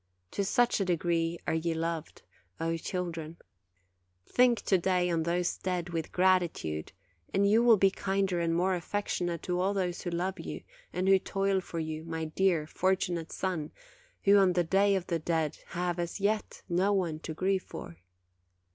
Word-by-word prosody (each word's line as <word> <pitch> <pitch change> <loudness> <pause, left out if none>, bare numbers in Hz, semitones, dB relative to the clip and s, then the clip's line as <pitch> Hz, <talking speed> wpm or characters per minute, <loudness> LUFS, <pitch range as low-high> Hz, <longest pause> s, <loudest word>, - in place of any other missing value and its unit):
To 200 - -1
such 240 +5 +2
a 195 - +1
degree 170 -1 0
are - - 0
ye 165 0 0
loved, 165 -1 -4 0.4
O 165 0 0
children! 170 -2 -4 0.9
Think 245 -2 +3
to 190 - +3
day 180 0 +1
on 165 -1 +1
those 175 +2 0
dead 180 -2 -2
with 165 -2 -3
gratitude, 175 - +1 0.4
and 200 +1 +3
you 215 +3 +5
will 235 -2 +7
be 195 0 +4
kinder 195 -2 0
and 165 -1 +1
more 185 +2 +2
affectionate 175 -2 -2
to 180 0 -1
all 195 +2 +1
those 180 -3 -1
who 175 - -3
love 175 +2 -2
you, - - -6 0.3
and 185 +1 -1
who 195 0 +6
toil 195 0 0
for 170 - -7
you, 160 -1 -3
my 160 -1 -3
dear, 165 -1 +1
fortunate 175 -1 -1
son, 175 -5 -2 0.5
who, 200 0 +6
on 190 -2 +5
the 175 0 +2
day 195 +4 +3
of 185 -2 -1
the 170 -2 -1
dead, 160 -2 -1
have, 175 0 -2
as 170 +3 -3
yet, 210 +2 -1
no 185 +4 +2
one 170 -6 0
to 160 0 -6
grieve 190 +2 +1
for. 85 - -9
180 Hz, 175 wpm, -30 LUFS, 165-190 Hz, 0.9 s, will